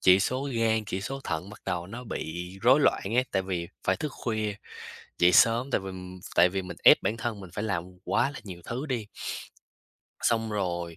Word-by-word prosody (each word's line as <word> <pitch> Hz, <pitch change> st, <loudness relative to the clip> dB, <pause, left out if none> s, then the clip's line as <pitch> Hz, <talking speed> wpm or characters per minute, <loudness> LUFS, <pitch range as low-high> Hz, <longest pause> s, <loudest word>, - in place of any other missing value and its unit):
chỉ 95 Hz, +1 st, +6 dB
số 130 Hz, +6 st, 0 dB
gan, 110 Hz, -1 st, +2 dB
chỉ 95 Hz, 0 st, -2 dB
số 135 Hz, +7 st, -4 dB
thận 85 Hz, +4 st, -3 dB
bắt 105 Hz, -, -12 dB
đầu 90 Hz, -2 st, -2 dB
nó 120 Hz, +6 st, -8 dB
bị 90 Hz, -5 st, -5 dB
rối 130 Hz, +5 st, +6 dB
loạn -, -, +3 dB
ấy. 125 Hz, +1 st, +4 dB
Tại 95 Hz, -, +2 dB
vì 90 Hz, -3 st, -3 dB, 0.2 s
phải 95 Hz, -, +3 dB
thức 155 Hz, -, -2 dB
khuya, 110 Hz, -3 st, -2 dB, 0.6 s
dậy 90 Hz, +1 st, +6 dB
sớm, 120 Hz, +7 st, +5 dB
tại 105 Hz, -, +2 dB
vì 95 Hz, -, -6 dB, 0.4 s
tại 90 Hz, -, +6 dB
vì 95 Hz, +1 st, -2 dB
mình 90 Hz, -1 st, -8 dB
ép -, -, +9 dB
bản 105 Hz, +4 st, -1 dB
thân 110 Hz, -2 st, -3 dB
mình 95 Hz, -2 st, -9 dB
phải 100 Hz, -, -3 dB
làm 95 Hz, -6 st, -1 dB, 0.2 s
quá 140 Hz, -, +1 dB
là 140 Hz, -, -8 dB
nhiều 90 Hz, -5 st, -9 dB
thứ 125 Hz, +5 st, -3 dB
đi. 120 Hz, -7 st, -2 dB, 1.2 s
Xong 115 Hz, -1 st, +2 dB
rồi, 85 Hz, -5 st, -2 dB
100 Hz, 210 wpm, -28 LUFS, 90-115 Hz, 1.2 s, ép